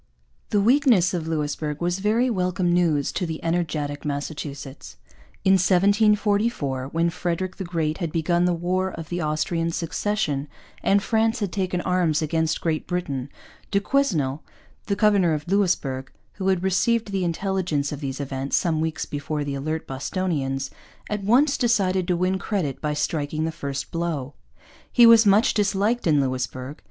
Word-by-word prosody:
The 205 - +2
weakness 230 - +4
of 165 -3 -2
Louisbourg 150 -1 -2
was 175 +2 -1
very 220 +5 +2
welcome 180 -5 0
news 160 -5 +2
to 165 -4 -3
energetic 160 -4 -2
Massachusetts. 140 - -5 0.5
In 190 - +6
1744, 200 - +2
when 165 +3 0
Frederick 180 +2 -3
the - - -4
Great 165 -3 -2
had 170 -4 -2
begun 170 +2 +1
the 180 - +2
War 185 +2 -1
of 165 -3 -8
the 175 0 -2
Austrian 165 +2 -1
Succession 165 -4 -1 0.3
and 200 0 +3
France 225 +1 +1
had 200 -4 -2
taken 185 -2 -1
arms 175 -4 +1
against 160 0 0
Great 160 -2 -1
Britain, 145 -7 -3 0.4
du 200 - +2
Quesnel, 170 - 0 0.5
the 200 - +1
governor 200 -6 +3
of 150 +1 -6
Louisbourg, 170 -9 0 0.2
who 190 - -4
had 190 -2 +2
received 215 +3 +1
the 195 -2 -1
intelligence 175 -4 -1
of 145 - -5
these 135 -2 -4
events 135 -1 -2
some 160 -3 0
weeks 160 -1 -2
before 145 +1 -3
the 145 -1 -3
alert 155 +4 -3
Bostonians, 135 -2 -2 0.4
at 210 -1 -2
once 270 +8 +3
decided 190 -7 +2
to 180 -2 +1
win 185 +2 0
credit 175 - -2
by 150 -1 -1
striking 150 +1 -1
the 165 - -1
first 140 -4 -5
blow. 160 -5 -3 0.6
He 240 - +7
was 230 -1 +7
much 205 +3 +5
disliked 205 +2 +1
in 150 -3 +4
Louisbourg. 130 +1 -3
170 Hz, 155 wpm, -24 LUFS, 150-195 Hz, 0.6 s, He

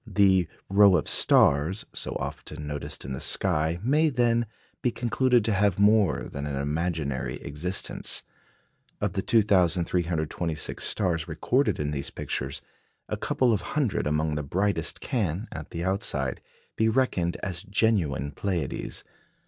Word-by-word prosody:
" - - -27 0.2
The 95 -3 +4 0.2
"rows 100 -1 +6
of 75 - -2
stars," 75 +8 +4
so - - -2
often 75 - -5
noticed 75 -2 -5
in 65 - -6
the 65 - -4
sky, 80 +3 +1
may, 150 +6 +3
then, 120 -3 +1 0.3
be 125 - +2
concluded 120 0 +1
to 110 - +1
have 100 -1 +2
more 100 -4 +4
than 70 +1 -5
an 70 - -3
imaginary 70 -3 -2
existence. 80 +6 -2 0.8
Of - - -1
the - - -1
2,326 85 -6 +1
stars 85 -5 0
recorded 125 - 0
in 75 0 -1
these 70 -2 -3
pictures, 70 +2 -4 0.5
a - - -1
couple 125 -3 +1
of 100 - 0 0.2
hundred 130 - +1
among 75 +1 0
the 75 - -1
brightest 85 +3 0
can, 105 - -2
at 80 -1 -7
the 85 0 -4
outside, 80 - -1 0.3
be 110 0 +2
reckoned 110 -8 +1
as 90 -4 -3
genuine 90 - 0
Pleiades. 85 -2 -3
90 Hz, 140 wpm, -27 LUFS, 75-105 Hz, 0.8 s, rows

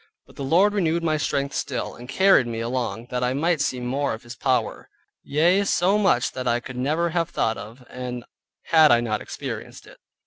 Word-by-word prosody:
But - - -20
the 140 - -6
Lord 180 +9 +3
renewed 170 -4 0
my 155 -2 +1
strength 140 -1 -1
still, 125 -4 -3
and 120 +1 -12
carried 190 -7 +4
me 115 -1 -4
along, 120 -1 -3
that 125 0 -1
I 125 +1 0
might 165 +1 +1
see 130 -2 -1
more 130 +1 -1
of 110 - -15
His 120 +1 -9
power; 125 -4 -1 0.3
yea, 175 +7 +2
so 195 +1 +2
much 160 -12 +2
that 130 -1 -5
I 120 0 +2
could 125 +1 -9
never 155 +7 0
have 165 0 0
thought 110 - 0
of, 120 +4 -11 0.8
had 160 -2 +5
I 120 - +5
not 110 -3 -2
experienced - - -7
it. - - -16
135 Hz, 200 wpm, -24 LUFS, 120-165 Hz, 0.8 s, had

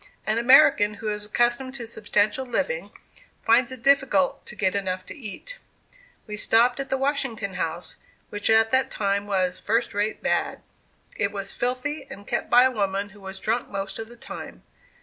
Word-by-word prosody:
An 215 +2 +1
American 235 -4 +6
who 215 +1 -4
is 210 0 -3
accustomed 240 +4 0
to 240 -3 -6
substantial 215 +1 0
living, - - -2 0.5
finds 240 +3 +4
it 255 -2 -8
difficult 275 0 +3
to - - -6
get 190 -3 0
enough 185 -2 -2
to - - -9
eat. 305 - -8 0.7
We 210 -1 -6
stopped 235 +4 +3
at 270 -1 -4
the 265 - 0
Washington 265 -7 -1
House, 170 -1 -4 0.3
which 205 0 -2
at 225 0 +5
that 260 0 +2
time 200 0 -1
was 185 -2 0
"first 230 +3 0
rate 205 +2 -2
bad." - - -1 0.5
It 200 -1 +1
was 200 -1 -3
filthy, 265 +4 -2
and 200 - -10
kept - - -2
by 245 +1 +7
a 260 - +4
woman 200 -3 -1
who 205 0 -17
was 190 0 -7
drunk 230 +3 -1
most 195 +1 -4
of 225 - -5
the 240 +1 -14
time. - - -9
220 Hz, 180 wpm, -25 LUFS, 200-260 Hz, 0.7 s, by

